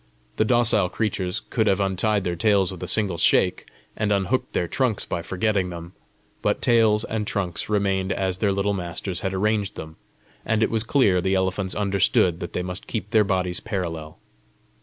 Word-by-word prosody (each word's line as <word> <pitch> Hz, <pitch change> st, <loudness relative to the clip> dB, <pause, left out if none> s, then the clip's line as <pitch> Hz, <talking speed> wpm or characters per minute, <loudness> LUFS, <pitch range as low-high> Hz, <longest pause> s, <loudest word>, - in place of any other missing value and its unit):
The 110 Hz, -, +3 dB
docile 110 Hz, -5 st, +3 dB
creatures 95 Hz, -4 st, -2 dB
could 110 Hz, -2 st, +1 dB
have 95 Hz, -2 st, +2 dB
untied 100 Hz, +1 st, 0 dB
their 90 Hz, -1 st, -2 dB
tails 100 Hz, 0 st, +2 dB
with 95 Hz, -, -9 dB
a -, -, -4 dB
single 100 Hz, -6 st, +1 dB
shake, 90 Hz, +2 st, +2 dB, 0.3 s
and 105 Hz, -1 st, -1 dB
unhooked 115 Hz, +6 st, 0 dB
their 85 Hz, -, 0 dB
trunks 125 Hz, +1 st, 0 dB
by 85 Hz, -, -3 dB
forgetting 95 Hz, +2 st, -1 dB
them; 85 Hz, 0 st, -8 dB, 0.5 s
but -, -, 0 dB
tails 110 Hz, -2 st, +3 dB
and 110 Hz, -2 st, -3 dB
trunks 90 Hz, -3 st, -3 dB
remained 95 Hz, -2 st, 0 dB
as 95 Hz, -1 st, -1 dB
their 105 Hz, -2 st, +2 dB
little 100 Hz, +1 st, 0 dB
masters 90 Hz, 0 st, -4 dB
had 95 Hz, -, -2 dB
arranged 105 Hz, +1 st, 0 dB
them, 80 Hz, 0 st, -9 dB, 0.5 s
and 110 Hz, 0 st, +1 dB
it -, -, +1 dB
was 110 Hz, -1 st, 0 dB
clear 115 Hz, -8 st, +3 dB
the 95 Hz, +1 st, +1 dB
elephants 95 Hz, 0 st, -1 dB
understood 95 Hz, -4 st, +2 dB
that 85 Hz, -, -6 dB
they 90 Hz, -, -2 dB
must 90 Hz, +1 st, -6 dB
keep 110 Hz, -2 st, -4 dB
their 110 Hz, -2 st, +5 dB
bodies 90 Hz, -3 st, -1 dB
parallel. 85 Hz, -7 st, -5 dB
95 Hz, 180 wpm, -23 LUFS, 90-105 Hz, 0.5 s, their